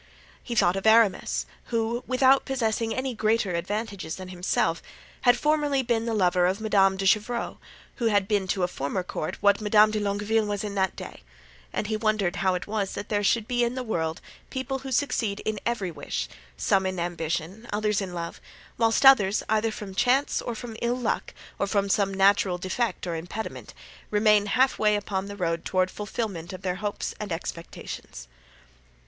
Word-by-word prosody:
He 240 Hz, -, -4 dB
thought 175 Hz, -4 st, +4 dB
of 195 Hz, -, -1 dB
Aramis, 220 Hz, -3 st, +4 dB, 0.2 s
who, 230 Hz, +1 st, -1 dB
without 260 Hz, +1 st, +4 dB
possessing 230 Hz, -3 st, -1 dB
any 260 Hz, +1 st, -2 dB
greater 215 Hz, -3 st, +1 dB
advantages 195 Hz, -1 st, -3 dB
than 185 Hz, -1 st, -8 dB
himself, 175 Hz, -2 st, 0 dB, 0.4 s
had 245 Hz, 0 st, +5 dB
formerly 295 Hz, -1 st, +1 dB
been 230 Hz, -1 st, 0 dB
the 230 Hz, -, 0 dB
lover 180 Hz, -2 st, +3 dB
of 190 Hz, +3 st, -1 dB
Madame 195 Hz, -3 st, +3 dB
de 195 Hz, -, -2 dB
Chevreuse, 215 Hz, +4 st, +1 dB, 0.4 s
who 240 Hz, -, -2 dB
had 205 Hz, -3 st, +2 dB
been 205 Hz, -3 st, +1 dB
to 185 Hz, 0 st, 0 dB
a -, -, +3 dB
former 175 Hz, +3 st, -3 dB
court 155 Hz, -3 st, -4 dB
what 200 Hz, +1 st, +4 dB
Madame 215 Hz, 0 st, +5 dB
de 215 Hz, -, -1 dB
Longueville 205 Hz, +2 st, 0 dB
was 205 Hz, -1 st, -2 dB
in 205 Hz, -1 st, -4 dB
that 190 Hz, -2 st, 0 dB
day; -, -, -9 dB, 0.5 s
and -, -, -2 dB
he 215 Hz, +1 st, -1 dB
wondered 215 Hz, -5 st, 0 dB
how 190 Hz, -1 st, +2 dB
it 180 Hz, -, -4 dB
was 205 Hz, -2 st, -2 dB
that 205 Hz, -, -6 dB
there 205 Hz, -1 st, 0 dB
should 220 Hz, +2 st, +2 dB
be 245 Hz, -1 st, +1 dB
in 240 Hz, +1 st, 0 dB
the 255 Hz, -, -3 dB
world 165 Hz, -8 st, -2 dB, 0.3 s
people 265 Hz, 0 st, -3 dB
who 265 Hz, 0 st, -7 dB
succeed 230 Hz, -6 st, 0 dB
in 215 Hz, -1 st, -2 dB
every 210 Hz, -7 st, -1 dB
wish, 60 Hz, -, -4 dB, 0.3 s
some 190 Hz, -1 st, +2 dB
in 185 Hz, -1 st, -3 dB
ambition, 175 Hz, +5 st, -3 dB
others 210 Hz, 0 st, 0 dB
in 190 Hz, -2 st, -4 dB
love, 170 Hz, -1 st, -5 dB, 0.4 s
whilst 225 Hz, +3 st, +3 dB
others, 210 Hz, -7 st, +6 dB
either 220 Hz, +1 st, +2 dB
from 210 Hz, -3 st, -7 dB
chance, 255 Hz, +8 st, +2 dB
or 240 Hz, -, -4 dB
from 230 Hz, 0 st, -7 dB
ill 240 Hz, +1 st, 0 dB
luck, 245 Hz, -3 st, -2 dB, 0.3 s
or 200 Hz, -, +1 dB
from 200 Hz, -1 st, +1 dB
some 195 Hz, 0 st, +2 dB
natural 195 Hz, -1 st, +3 dB
defect 190 Hz, +6 st, -2 dB
or 170 Hz, -2 st, -2 dB
impediment, 175 Hz, +7 st, -6 dB, 0.3 s
remain 210 Hz, -1 st, +4 dB
half 255 Hz, +5 st, +2 dB
way 210 Hz, -1 st, +4 dB
upon 200 Hz, -1 st, -2 dB
the 205 Hz, 0 st, -7 dB
road 165 Hz, -3 st, -1 dB
toward 185 Hz, -1 st, +1 dB
fulfilment 205 Hz, -5 st, -4 dB
of 185 Hz, -, -9 dB
their 185 Hz, -1 st, -1 dB
hopes 205 Hz, +1 st, -3 dB
and 210 Hz, -3 st, -5 dB
expectations. 165 Hz, -, -6 dB
205 Hz, 185 wpm, -26 LUFS, 185-225 Hz, 0.5 s, others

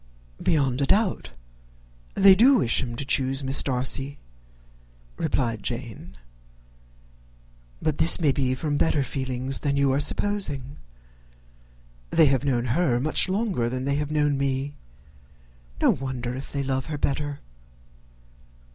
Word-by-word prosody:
"Beyond 140 Hz, -4 st, +1 dB
a 140 Hz, -, +1 dB
doubt 190 Hz, -, +1 dB, 0.8 s
they 195 Hz, 0 st, +7 dB
do 250 Hz, +8 st, +5 dB
wish 120 Hz, -, +2 dB
him 120 Hz, -2 st, -5 dB
to 135 Hz, -, -5 dB
choose 135 Hz, 0 st, 0 dB
Miss 135 Hz, +1 st, +3 dB
Darcy," 135 Hz, +1 st, -2 dB, 1.0 s
replied 120 Hz, -8 st, -1 dB
Jane; 115 Hz, -6 st, -6 dB, 1.7 s
"but 155 Hz, -2 st, -1 dB
this 165 Hz, +3 st, +4 dB
may 155 Hz, -5 st, +3 dB
be 130 Hz, -1 st, 0 dB
from 145 Hz, +2 st, -2 dB
better 145 Hz, -2 st, +1 dB
feelings 130 Hz, 0 st, -3 dB
than 140 Hz, -1 st, -1 dB
you 140 Hz, -1 st, +2 dB
are 135 Hz, -, +1 dB
supposing. 145 Hz, -6 st, -1 dB, 1.3 s
They 160 Hz, -, +4 dB
have 135 Hz, -2 st, +2 dB
known 125 Hz, -4 st, 0 dB
her 135 Hz, -8 st, +1 dB
much 155 Hz, +6 st, +2 dB
longer 190 Hz, -, -1 dB
than 130 Hz, +1 st, -4 dB
they 140 Hz, 0 st, 0 dB
have 150 Hz, 0 st, -2 dB
known 150 Hz, -2 st, +1 dB
me; 135 Hz, +1 st, -2 dB, 1.1 s
no -, -, +4 dB
wonder 125 Hz, -2 st, -4 dB
if 130 Hz, +2 st, -8 dB
they 140 Hz, -1 st, -2 dB
love 135 Hz, 0 st, -2 dB
her 155 Hz, -1 st, -4 dB
better. 145 Hz, 0 st, -2 dB
140 Hz, 135 wpm, -25 LUFS, 130-150 Hz, 1.7 s, they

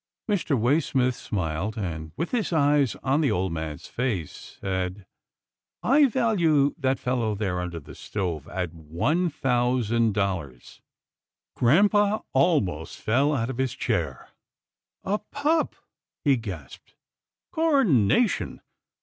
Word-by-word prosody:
Mr. 175 Hz, -, +1 dB
Waysmith 130 Hz, 0 st, +2 dB
smiled, 95 Hz, 0 st, -3 dB
and, 80 Hz, -6 st, -4 dB
with 165 Hz, -, -2 dB
his 235 Hz, -6 st, 0 dB
eyes 145 Hz, -4 st, +3 dB
on 135 Hz, +4 st, +2 dB
the 145 Hz, -, +2 dB
old 90 Hz, -1 st, 0 dB
man's 80 Hz, -2 st, -5 dB
face, 115 Hz, -, -4 dB
said, 95 Hz, 0 st, -3 dB, 0.4 s
" -, -, -66 dB
I 280 Hz, +3 st, +5 dB
value 175 Hz, -, +2 dB
that 135 Hz, -2 st, +1 dB
fellow 120 Hz, -4 st, -1 dB
there 95 Hz, -3 st, -2 dB
un 90 Hz, 0 st, -3 dB
der 85 Hz, -, -7 dB
the 70 Hz, -, -12 dB
stove 85 Hz, -8 st, -4 dB
at 90 Hz, -2 st, -4 dB
one 85 Hz, -, 0 dB
thousand 120 Hz, -5 st, +1 dB
dollars." 85 Hz, -12 st, -3 dB, 0.7 s
Grampa 205 Hz, -, +3 dB
almost 120 Hz, -, +1 dB
fell 140 Hz, +7 st, +2 dB
out 115 Hz, 0 st, -1 dB
of 130 Hz, -, -8 dB
his 130 Hz, -2 st, 0 dB
chair. 85 Hz, -, -2 dB, 0.4 s
" -, -, -67 dB
A 205 Hz, +2 st, 0 dB
pup," 295 Hz, +8 st, 0 dB, 0.5 s
he 140 Hz, -2 st, +5 dB
gasped, 95 Hz, -, -8 dB, 0.3 s
" -, -, -67 dB
Coronation 245 Hz, -, +2 dB
120 Hz, 130 wpm, -26 LUFS, -, 0.7 s, I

